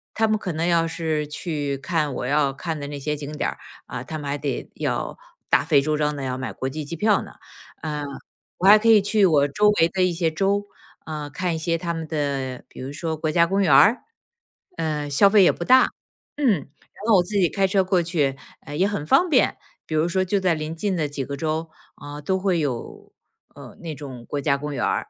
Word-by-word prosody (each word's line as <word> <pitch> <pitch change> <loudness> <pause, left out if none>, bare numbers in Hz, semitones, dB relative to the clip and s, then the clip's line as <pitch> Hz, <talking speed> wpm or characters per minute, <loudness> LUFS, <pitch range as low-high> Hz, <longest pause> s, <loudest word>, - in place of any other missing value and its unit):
他 220 0 +2
们 215 0 +2
可 185 - -4
能 160 +2 -1
要 170 -1 +3
是 160 -2 -2
去 145 -2 -3
看 155 +1 -1
我 - - -3
要 140 +1 +2
看 160 +3 -4
的 145 - -5
那 145 0 -6
些 150 +2 -2
景 145 0 -7
点 150 - -1
儿， - - -12 0.3
啊， 125 - -6
他 155 +4 -6
们 145 -2 -6
还 140 - 0
得 140 -2 -4
要 - - -2 0.3
大 - - +4
费 150 -2 +4
周 155 +2 0
章 150 0 0
地 140 - -5
要 130 -1 -2
买 130 - -4
国 130 - -4
际 155 +3 -5
机 150 +4 -6
票 210 +5 +2
呢。 - - -11 0.5
嗯， 150 -2 -3 0.5
我 185 - +1
还 210 +2 +9
可 230 +2 +2
以 220 -2 +8
去 205 0 +3
我 145 -4 +3
周 210 +9 +3
围 165 - +6
的 190 +2 -2
一 185 - +2
些 165 -1 0
州， 195 +5 0 0.4
啊， 150 -2 -5
看 170 +5 -2
一 - - -3
些 165 +1 0
它 170 0 -3
们 165 -1 -5
的， 140 -4 -3
比 - - -14
如 130 +2 -5
说 160 +2 -3
国 155 0 -2
家 170 +2 +4
公 195 +3 0
园 180 -7 +3
儿， 215 - +6 0.8
嗯， 150 -2 -2
消 195 +8 +5
费 200 -1 +6
也 - - +6
不 - - -6
大。 255 +8 +6 0.5
嗯， 285 -4 +3
然 155 -9 -1 0.4
后 220 -4 +6
我 180 - +4
自 205 +4 -7
己 190 -3 +4
开 195 -1 +1
车 190 0 +2
过 185 -1 +2
去， 150 -6 0 0.2
呃， 145 - -8
也 185 +6 +2
很 205 -8 -3
方 350 - +4
便。 275 -5 +3 0.3
比 155 - -4
如 155 +2 +2
说 185 +2 +1
就 195 +2 0
在 185 -3 +2
临 155 0 -4
近 195 +3 -1
的 155 -4 -1
几 140 -2 -4
个 140 - -5
州， 160 +2 -2 0.3
啊， 145 +1 -9
都 190 +5 0
会 185 -3 +1
有， 130 -6 -5 0.4
呃， - - -12
那 165 -2 -5
种 130 -4 -9
国 145 - -3
家 140 0 +1
公 150 +1 -5
园 - - -1
儿。 - - -1
160 Hz, 255 characters per minute, -23 LUFS, 145-185 Hz, 0.8 s, 还